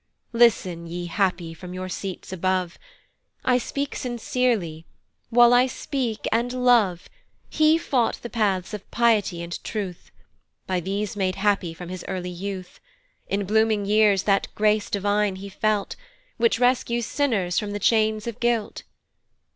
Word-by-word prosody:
"Listen, 190 -8 +3
ye 175 +1 -5
happy, 175 -2 -1
from 180 +2 -9
your 185 0 -4
seats 190 0 -6
above. 185 -1 -1 0.7
"I 250 -1 +4
speak 280 +3 -3
sincerely, 235 -9 -1 0.4
while 240 +1 +6
I 250 +1 +5
speak 255 -4 -3
and 235 +2 +1
love, 240 -8 +2 0.4
"He 310 +1 +4
sought 255 -7 0
the - - -3
paths 200 -4 0
of 210 -2 -7
piety 210 -7 +2
and 170 0 -6
truth, 195 -6 -5 0.6
"By 185 -1 -1
these 200 +5 -3
made 190 -2 0
happy 195 -4 +1
from 175 0 -8
his 185 0 -6
early 180 -2 -4
youth; 185 0 -6 0.5
"In 200 0 -1
blooming 215 0 +2
years 210 -2 +4
that 195 -1 +2
grace 215 +1 +2
divine 205 0 +1
he 195 +1 -8
felt, 210 +1 -1 0.4
"Which 230 -1 +3
rescues 240 -2 +2
sinners 215 -13 0
from 210 -2 -4
the 205 - -3
chains 215 0 +2
of 235 -1 -5
guilt. 235 -3 0
205 Hz, 145 wpm, -24 LUFS, 185-235 Hz, 0.7 s, while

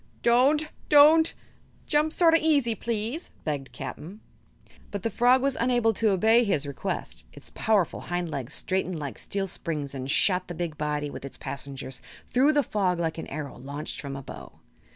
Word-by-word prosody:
"Don't 275 +6 +4 0.2
don't! 310 +3 +7 0.5
Jump 300 +1 +2
sort 330 0 +4
o' - - +7
easy, 290 -8 +2
please," 230 +8 -3
begged 140 -3 -3
Cap'n 150 +8 -7 0.5
Bill. - - -25
But 200 -2 -5
the 230 - -1
frog 250 +5 +4
was 275 -1 +1
unable 240 -2 +2
to 220 +1 +2
obey 220 +5 +4
his 190 -10 0
request. 140 - -5
Its - - -10
powerful 210 -6 +1
hind 175 -1 -2
legs 130 -4 -4
straightened 185 -2 -1
like 145 -4 -6
steel 195 -1 -2
springs 150 -6 -4
and 135 -1 -5
shot 185 +5 +2
the 175 - -6
big 170 -2 -3
body, 150 -1 -2
with - - -8
its 140 - -8
passengers, 135 -2 -6 0.3
through 275 +5 +4
the 290 -1 +3
fog 190 -6 0
like 165 -1 -2
an - - -6
arrow 140 -3 -6
launched 140 +4 -5
from 140 -2 -6
a 135 - -7
bow. - - -10
190 Hz, 180 wpm, -26 LUFS, 150-245 Hz, 0.5 s, don't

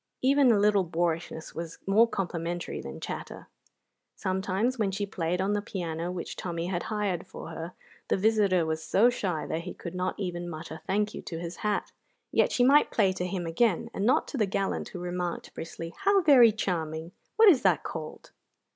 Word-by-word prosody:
Even 275 -1 +5
a 220 - +4
little 205 -1 +4
boorishness 165 -1 -2
was 165 0 -6
more 215 +4 +5
complimentary 175 -4 -3
than 70 - -8
chatter. - - -7 0.7
Sometimes 195 +6 -1
when 210 -3 +2
she 200 +1 -2
played 180 -2 -2
on 195 +2 +1
the 205 - 0
piano 175 -4 -4
which 180 -2 -5
Tommy 170 -2 -3
had 175 -1 -2
hired 205 -5 -1
for - - -9
her, 165 +2 -6 0.3
the - - +1
visitor 200 -4 +3
was 160 0 -2
so 230 +9 +4
shy 180 -9 -2
that 160 - -2
he 180 +1 -7
could 170 - -7
not 180 0 -2
even 175 -3 -3
mutter 160 0 -7
"Thank 210 +2 0
you" - - -6
to 165 - -6
his 170 +1 -6
hat; 210 -1 -1 0.4
yet - - +3
she 245 - +2
might 280 +4 +6
play 195 -4 +2
to 180 -1 -3
him 180 -1 -3
again, 175 +3 +1
and 195 - -2
not 240 - +3
to - - -4
the 215 -4 +2
gallant 195 0 -2
who 180 - -7
remarked 175 -1 -4
briskly: 165 +1 -7
"How 395 0 +4
very 255 -7 +8
charming! 165 -5 -3 0.2
What 445 -1 +8
is 295 -9 +5
that 185 -6 +3
called?" 155 -2 -7
185 Hz, 190 wpm, -28 LUFS, 170-210 Hz, 0.7 s, very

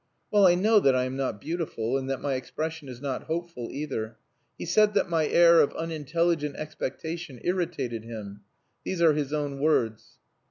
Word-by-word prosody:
Well, 205 -2 +6
I 175 - +5
know 210 +4 +4
that 135 -8 +4
I 125 - +2
am 130 +1 -3
not 135 -6 -2
beautiful, 150 -6 -2
and 135 0 -2
that 135 -2 -2
my 140 - 0
expression 155 +3 -4
is 125 0 -9
not 135 -3 -3
hopeful 165 -7 -4
either. 130 -6 -4 0.4
He - - -5
said 210 -1 +3
that 195 -3 +1
my 160 -2 +2
air 170 -1 +6
of - - +1
unintelligent 165 -1 -1
expectation 155 -1 -5
irritated 160 -11 -2
him. 105 -3 -8 0.4
These 185 - -3
are 160 -2 +6
his 145 -2 -2
own 145 -2 -2
words." 120 -7 0
150 Hz, 175 wpm, -27 LUFS, 130-170 Hz, 0.4 s, Well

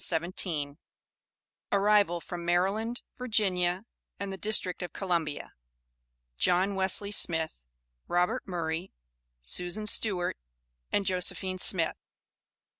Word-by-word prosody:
ARRIVAL 200 -3 +3
FROM 175 0 -7
MARYLAND, 195 +7 0 0.2
VIRGINIA, 190 -5 0 0.3
AND 200 -1 -4
THE - - -6
DISTRICT 190 -3 +2
OF 180 - -6
COLUMBIA. 170 -6 -3 0.9
JOHN 185 +3 +2
WESLEY 195 +1 0
SMITH, 160 - +3 0.4
ROBERT 175 0 0
MURRAY, 170 0 -4 0.5
SUSAN 180 - +1
STEWART, 205 -4 +2 0.5
AND 200 - 0
JOSEPHINE 185 0 0
SMITH. 170 -3 +3
185 Hz, 90 wpm, -28 LUFS, 175-200 Hz, 0.9 s, ARRIVAL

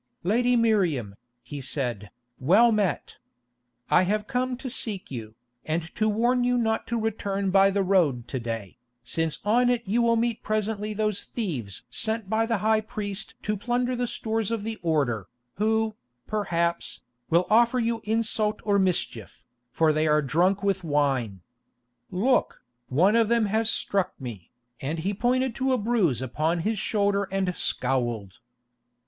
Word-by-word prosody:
"Lady 245 +7 +2
Miriam," 180 - +1 0.3
he 145 -2 -7
said, 120 -7 -3 0.3
"well 200 - +5
met. 210 -4 -1 0.7
I - - +6
have 210 +3 0
come 250 +1 -1
to 260 - -7
seek 220 - -3
you, 110 -4 -7 0.3
and 160 +1 -3
to 215 0 +1
warn 240 +4 +2
you 245 0 +2
not 225 -2 0
to 235 0 -1
return 200 -3 -1
by 195 0 +6
the 195 0 +1
road 160 -11 +2
to 130 - -2
day, 115 -4 -5 0.2
since 160 +5 -1
on 240 +4 +4
it 245 -1 +1
you 220 +5 +1
will 230 0 +3
meet 230 0 0
presently 215 0 -2
those 215 -1 -1
thieves 135 - -4
sent 220 -2 -2
by 225 +1 +2
the 230 -1 +1
high 220 0 +4
priest 210 -1 -6
to 210 - 0
plunder 245 +4 -1
the 245 0 -1
stores 220 -2 -2
of 230 -3 -2
the 225 0 -4
Order, 140 - 0 0.3
who, 220 +1 +1 0.3
perhaps, 170 -5 -1 0.3
will 170 +2 +3
offer 235 +3 +5
you 230 -1 0
insult 215 -1 0
or 200 -1 +3
mischief, 175 - -2 0.3
for 155 +3 +3
they 155 +1 +1
are 150 0 +3
drunk 180 +8 +2
with 195 -2 0
wine. 135 - 0 0.7
Look, 240 +8 +1 0.2
one 180 - +3
of 230 -2 +4
them 235 -1 +3
has 220 +2 +1
struck 195 -4 -1
me," 115 -10 -8 0.3
and 150 +5 -2
he 185 +5 -1
pointed 250 +4 +1
to 265 0 +1
a - - +3
bruise 205 - +1
upon 155 +7 -1
his 215 +3 -1
shoulder 200 -1 +1
and 190 -2 0
scowled. 120 -6 -1
200 Hz, 160 wpm, -26 LUFS, 155-225 Hz, 0.7 s, I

